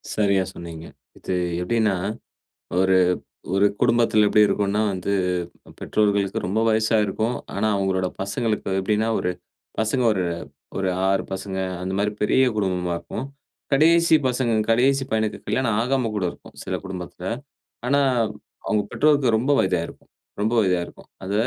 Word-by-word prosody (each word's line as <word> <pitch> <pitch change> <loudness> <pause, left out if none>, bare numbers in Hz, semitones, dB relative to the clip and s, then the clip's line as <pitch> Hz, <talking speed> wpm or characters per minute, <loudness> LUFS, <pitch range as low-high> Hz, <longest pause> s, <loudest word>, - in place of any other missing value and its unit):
சரியா 100 -3 +2
சொன்னீங்க. 85 -1 -8 0.3
இது 95 - -3 0.3
எப்படின்னா, 105 0 +1 0.8
ஒரு 95 0 +4 0.6
ஒரு 100 +1 +4
குடும்பத்தில 115 -3 +4
எப்படி 105 0 +5
இருக்கும்னா 105 +1 0
வந்து 95 +1 -2 0.6
பெற்றோர்களுக்கு 100 -2 +1
ரொம்ப 100 +5 0
வயசா 110 0 +2
இருக்கும். 110 +5 -1 0.2
ஆனா 110 +2 +1
அவங்களோட 95 -1 0
பசங்களுக்கு 105 +2 -2
எப்படின்னா 105 +3 0
ஒரு 90 - -1 0.5
பசங்க 110 +4 +1
ஒரு 95 -3 -1 0.5
ஒரு 95 -1 0 0.2
6 95 - +2
பசங்க 95 0 -4 0.2
அந்த 95 +1 -3
மாரி 105 +1 +1
பெரிய 130 +5 +4
குடும்பமா 90 -3 0
இருக்கும். 135 - -6 0.5
கடேசி 165 +3 +5
பசங்க 125 -2 0 0.2
கடேசி 135 +3 +3
பையனுக்கு 110 -1 0
கல்யாணம் 120 -5 0
ஆகாம 125 -2 0
கூட 100 -3 -1
இருக்கும், - - -15
சில 95 0 -3
குடும்பத்தில. 90 -1 -7 0.6
ஆனா 140 +1 +3 0.7
அவங்க 105 -2 +1
பெற்றோருக்கு 140 -6 +3
ரொம்ப 135 +5 +1
வயதாயிருக்கும் 90 -3 -2 0.3
ரொம்ப 110 +2 +1
வயதாயிருக்கும். 90 -3 -2 0.2
அத 95 - -4
105 Hz, 130 wpm, -23 LUFS, 95-115 Hz, 0.8 s, எப்படி